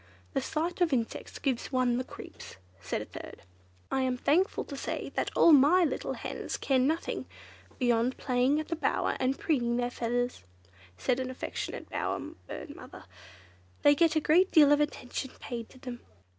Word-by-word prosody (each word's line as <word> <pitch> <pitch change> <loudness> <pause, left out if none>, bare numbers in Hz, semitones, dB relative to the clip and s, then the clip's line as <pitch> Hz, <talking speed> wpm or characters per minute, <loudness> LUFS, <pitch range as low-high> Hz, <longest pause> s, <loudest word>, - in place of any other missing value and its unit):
"The - - +1
sight 335 +4 -2
of 345 -3 +4
insects 230 -3 -2
gives 265 -2 -2
one 250 -2 +2
the - - -1
creeps!" - - -11 0.3
said - - -3
a - - -11
third. - - -10 0.5
"I 265 - +1
am 255 -1 0
thankful 345 +9 +2
to 280 - -8
say 275 - -4 0.2
all 335 - +7
my 305 +6 +7
little 315 - -1
hens - - -5
care 270 -2 +2
for 255 - +3
nothing 320 +4 -1 0.5
beyond 245 0 +2
playing 255 +3 +2
at 310 - -5
the 335 - 0
Bower 320 - 0
and 260 +1 +1
preening 240 -7 +1
their 245 0 0
feathers," 245 - -2 0.5
said 250 - 0
an 260 0 -2
affectionate 255 - -5
bower - - -2 0.3
bird - - -7
mother. - - -11 0.8
"They 290 - +8
get 325 +1 +3
a 315 +4 +5
deal 295 -3 +7
of 295 0 +5
attention 265 -3 -3
paid 235 -2 -6
to - - -16
them." 250 -2 -7
265 Hz, 170 wpm, -30 LUFS, 245-305 Hz, 0.8 s, They